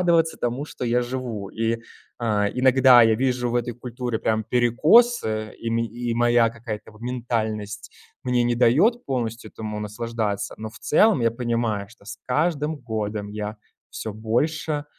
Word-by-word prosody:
радоваться 170 -2 +3
тому, 120 +4 -2
что 150 - -7
я 120 +1 +2
живу. 120 -5 -5
И, 115 +1 0 0.5
э, 105 -3 +1
иногда 130 -1 +6
я 115 -1 +5
вижу 125 -1 0
в - - -3
этой 120 0 -1
культуре 120 -1 -4
прям 110 -1 0
перекосы, 120 - +3
и 115 - -4
мен 115 0 +1
и 120 +1 -4
моя 120 -1 +3
какая-то 115 -2 -7
вот 110 - -18
ментальность 110 -4 -3 0.3
мне 125 -1 +2
не 120 0 +1
даёт 155 - +3
полностью 115 -4 -3
этому 105 -1 -6
наслаждаться, 105 -1 -3
но 110 0 -6
в 115 - -14
целом 210 - +4
я 115 - +3
понимаю, 115 -4 -2
что 115 -2 -20
с 100 -1 -8
каждым 150 +3 0
годом 110 -5 -4
я 105 +1 -5 0.3
всё 110 - -5
больше, 145 +8 -1
120 Hz, 160 wpm, -24 LUFS, 110-125 Hz, 0.5 s, иногда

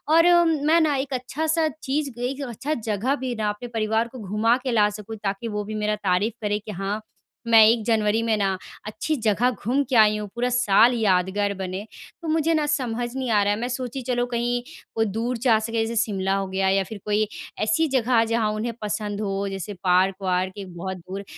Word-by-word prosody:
और 340 +2 +6
मैं 315 +1 +3
ना 300 -3 +2
एक 270 0 -3
अच्छा-सा 315 +6 0 0.2
चीज़ 285 0 -1
एक 265 +3 -3
अच्छा 275 +7 -3
जगह 225 +2 -1
भी 255 -3 -4
ना 215 -1 -1
अपने 210 +4 -5
परिवार 220 +1 +1
को 255 - -9
घुमा 215 +4 +1
के 255 - -1
ला 210 -2 +4
सकूँ 210 +1 -8
ताकि 195 +3 -2
वो 210 -1 -3
भी 215 +1 -6
मेरा 210 0 0
तारीफ़ 200 +2 0
करें 210 0 0
कि 215 - -6
हाँ, 200 +3 -3 0.5
मैं 225 -1 +8
1 230 0 +3
जनवरी 220 -1 +2
में 225 -1 +2
ना 195 -1 +1 0.4
अच्छी 310 +8 -2
जगह 225 +3 +3
घूम 250 +5 0
के 260 - 0
आई 215 -1 +6
हूँ 210 -1 -5
पूरा 245 +1 0
साल 240 -1 +4
यादगार 200 -1 +1
बने। 190 0 -5 0.4
तो 330 - -6
मुझे 320 +1 +2
ना 310 -2 +1
समझ 245 -5 -1
नहीं 260 -2 -2
आ 205 -1 +4
रहा 205 0 +2
है 210 - -3
मैं 245 - -2
सोची 255 +1 -4
चलो 245 0 0
कहीं 240 0 -1
अ, - - -22 0.3
कोई 225 0 +2
दूर 230 +4 -2
जा 230 -2 +3
सकें 225 +1 -5
जैसे 230 +1 -4
शिमला 195 -3 -1
हो 195 0 -1
गया 190 0 0
या 195 0 +2
फ़िर 205 +2 -9
कोई 210 0 +1 0.4
ऐसी 320 +7 +2
जगह 245 -3 +2
जहाँ 225 -2 +1
उन्हें 230 +2 -3
पसंद 210 0 -3
हो 200 -1 -2
जैसे 195 +1 -5
पार्क-वार्क, 185 0 +1
एक 190 -3 -8
बहुत 190 +1 -4
दूर, 190 +3 -7
220 Hz, 215 wpm, -24 LUFS, 205-250 Hz, 0.5 s, मैं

